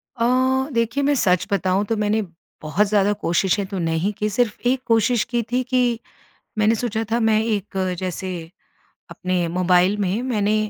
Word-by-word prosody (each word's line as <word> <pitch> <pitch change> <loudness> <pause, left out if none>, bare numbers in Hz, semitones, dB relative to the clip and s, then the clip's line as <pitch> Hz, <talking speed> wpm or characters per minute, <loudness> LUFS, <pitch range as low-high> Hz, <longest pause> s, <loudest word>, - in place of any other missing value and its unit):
अ, 230 -2 0 0.5
देखिए 235 +4 0
मैं 285 +1 +2
सच 185 -6 +2
बताऊँ 195 0 +1
तो 225 - -1
मैंने, 210 +1 +1 0.4
बहुत 180 +7 +1
ज़्यादा 205 0 +2
कोशिशें 195 0 0
तो 195 - -5
नहीं 165 +4 0
की, 210 +1 -2
सिर्फ 225 +1 0
एक 255 +1 +2
कोशिश 230 0 +3
की 240 - +2
थी 250 +1 +2
कि 245 -2 +1 0.6
मैंने 215 +1 +3
सोचा 225 -1 -2
था, 235 - +2
मैं 220 -1 +3
एक 205 -3 -2 0.2
जैसे, 180 -2 -5 0.6
अपने 180 -1 -1
मोबाइल 180 +2 +2
में 200 +4 -1
मैंने 215 -4 0
210 Hz, 165 wpm, -21 LUFS, 185-230 Hz, 0.6 s, कोशिश